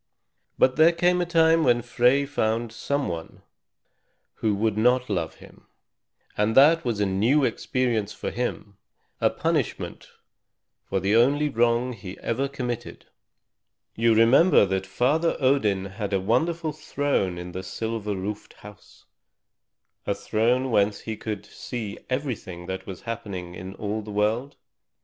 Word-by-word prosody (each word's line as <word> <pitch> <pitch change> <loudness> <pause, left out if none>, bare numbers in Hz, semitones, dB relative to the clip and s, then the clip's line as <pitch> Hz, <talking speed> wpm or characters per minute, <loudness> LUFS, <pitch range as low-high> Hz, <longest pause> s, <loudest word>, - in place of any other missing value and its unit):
But 130 +1 +3
there 160 +2 +6
came 180 +1 +2
a 175 - -1
time 165 -1 +4
when 120 -4 +3
Frey 125 +3 +3
found 115 -4 -1
some 140 +5 -2
one 85 -1 -7 0.9
who 110 -2 0
would 110 +1 0
not 125 +2 +2
love 85 -5 -2
him; - - -17 0.7
and 105 +3 +1
that 160 +5 +6
was 115 -4 -2
a 105 - +2
new 110 +10 +2
experience 120 -6 -1
for - - -5
him, 110 -4 -4 0.4
a - - +3
punishment - - -2 0.8
for 95 - 0
the 100 +3 +1
only 140 +6 +3
wrong 120 0 +1
he 95 -4 -9
ever 130 +4 -1
committed. 125 -4 -5 0.9
You 115 0 +3
remember 115 - +6
that 95 0 -2
Father 150 - +1
Odin 110 -8 +2
had 100 +1 -5
a 95 - +2
wonderful 160 - 0
throne 145 - -1
in 90 0 -7
the 95 - -5
silver 110 +1 -4
roofed 100 +2 -5
house, 105 0 -15 1.0
a - - +1
throne 125 +4 0
whence 100 -1 +2
he 110 - -5
could 110 0 -5
see 115 -5 -6
everything 120 -10 -4
that 95 +1 -6
was 95 -3 -7
happening 100 -7 -6
in 95 +2 -8
all 105 +1 -3
the 105 - -10
world? 110 +6 0
115 Hz, 145 wpm, -25 LUFS, 100-130 Hz, 1.0 s, there